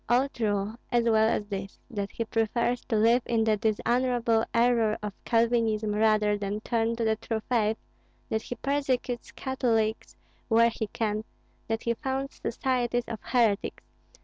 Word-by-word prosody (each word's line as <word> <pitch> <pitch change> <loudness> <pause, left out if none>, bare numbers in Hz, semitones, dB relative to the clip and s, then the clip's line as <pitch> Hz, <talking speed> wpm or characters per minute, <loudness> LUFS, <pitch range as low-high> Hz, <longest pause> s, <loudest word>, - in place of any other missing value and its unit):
All 250 +3 +4
true, 210 -2 -2
as 240 -1 +3
well 220 -1 +4
as 210 - 0
this, 195 -1 -6
that 200 -3 -3
he 230 - -4
prefers 235 +2 0
to 230 - -1
live 230 +3 +4
in 230 -2 +2
the 220 -1 +3
dishonorable 230 +2 +1
error 230 -2 +3
of 210 -1 -3
Calvinism 225 -2 +2
rather 210 -1 +3
than 205 +1 -2
turn 230 0 0
to 230 - -2
the 220 -1 +1
true 220 0 -3
faith, 220 -3 +1 0.5
that 220 - -1
he 245 - -6
persecutes 260 -3 -1
Catholics 230 -5 -1 0.3
where 230 0 +4
he 220 - -3
can, 215 0 -2 0.4
that 225 0 -2
he 235 - +1
founds 265 +3 -4
societies 245 -1 0
of 220 - -5
heretics. 225 -5 +1
225 Hz, 155 wpm, -28 LUFS, 215-240 Hz, 0.5 s, All